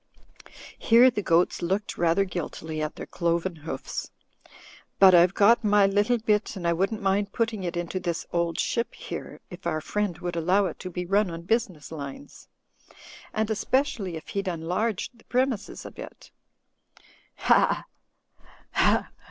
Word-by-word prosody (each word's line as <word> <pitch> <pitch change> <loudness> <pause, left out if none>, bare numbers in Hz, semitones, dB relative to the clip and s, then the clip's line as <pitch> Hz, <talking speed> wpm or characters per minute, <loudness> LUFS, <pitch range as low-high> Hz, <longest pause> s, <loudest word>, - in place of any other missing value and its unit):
Here 240 +2 +6
the 210 - -2
goats 170 -1 +2
looked 195 +4 -1
rather 175 +3 +2
guiltily 160 -3 -5
at 155 0 -3
their - - -7
cloven 170 +1 -1
hoofs. 145 -3 -5 0.9
"But 190 -1 +8
I've 175 +2 +6
got 230 +3 +5
my 205 -1 +5
little 205 +5 +2
bit 215 -1 0
and 175 -3 -3
I 170 - +3
wouldn't 195 +5 -1
mind 195 +1 +1
putting 225 -4 -1
it 175 -1 -3
into 175 +2 -3
this 175 -2 -3
'Old 170 -1 0
Ship' 235 -1 -1
here, - - -7
if 175 0 -7
our 155 -2 0
friend 205 +1 -2
would 175 -1 -4
allow 180 +5 +2
it 175 - -5
to 185 - -6
be 180 0 -4
nm 195 +1 +2
on 165 0 -6
business 185 -7 -1
lines. 145 - -9 0.8
And 220 0 -1
especially 220 - 0
if 160 - -11
he'd 200 -1 -3
enlarge 180 +5 -2
the 230 - -22
premises 250 -4 -1
a - - -7
bit. - - -11 1.0
Ha! - - +3 0.9
ha - - +2
190 Hz, 155 wpm, -26 LUFS, 170-215 Hz, 1.0 s, But